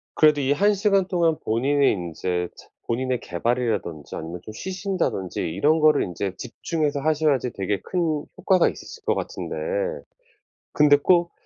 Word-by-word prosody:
그래도 150 -2 +5
이 135 +1 +1
1 205 +8 +4
시간 195 -2 +2
동안 170 -4 +2
본인이 135 +5 +2
인제 90 0 -2
체 - - -15 0.2
본인의 125 +1 -1
개발이라든지 110 -6 -2
아니면 85 +2 -6
좀 110 - -8
쉬신다든지 185 - -2
이런 145 - +2
거를 155 -1 +5
인제 95 +2 -4
집중해서 150 +3 -2
하셔야지 150 -5 +1
되게 100 0 -2
큰 160 -5 -1
효과가 185 -2 +3
있으실 460 -2 -7
것 - - +3
같은데 - - -4 1.2
근데 145 -1 +6
꼭 170 +3 +3
145 Hz, 325 characters per minute, -24 LUFS, 100-165 Hz, 1.2 s, 근데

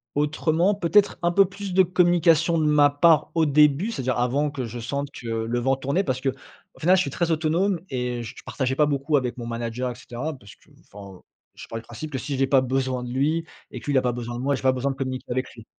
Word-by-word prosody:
autrement. 155 +5 +1
Peut-être 200 +2 +2
un 175 0 +2
peu 195 +2 +5
plus 195 0 -7
de 190 - +6
communication 170 -2 +3
de 155 - +1
ma 150 -1 +5
part 155 +1 +3
au 165 -1 +3
début, 150 +7 +3
c'est-à-dire 130 - -2
avant 130 +5 +1
que 140 -3 -5
je 120 +1 -7
sente 140 +5 -3
que 120 - -10
le 115 +1 -1
vent 135 +2 +1
tournait. 140 +9 -1
Parce 130 -2 -2
qu'au 135 0 0 0.5
final, 180 +4 +4
je 185 - +3
suis 140 - -3
très 170 +4 -1
autonome 170 +4 +1
et 125 -2 -3
je 115 +1 -8
partageais 130 -1 -2
pas 150 +1 +3
beaucoup 145 +1 +1
avec 125 -2 -2
mon 120 - -6
manager 115 +2 -3
et - - -9
cetera 125 +5 -6
parce 120 -7 -14
que, - - -28 0.2
enfin, 100 -2 -11 0.3
je - - -11
pars 115 - -6
du 115 - -13
principe 135 +7 -8
que 135 - -3
si 135 +3 -4
j'ai 135 0 +2
pas 135 -1 +4
besoin 130 -1 -1
de 120 - -6
lui 155 +6 0 0.3
et - - -7
que - - -14
lui 145 - -1
il - - +4
a 130 - +4
pas 125 - 0
besoin 120 0 -5
de 120 - -5
moi, 140 +2 +1
j'ai - - -7
pas 130 - +5
besoin 130 +2 -1
de - - -6
communiquer 130 -2 -5
avec 130 +1 -1
lui. 115 -1 -13
140 Hz, 260 wpm, -24 LUFS, 125-160 Hz, 0.5 s, de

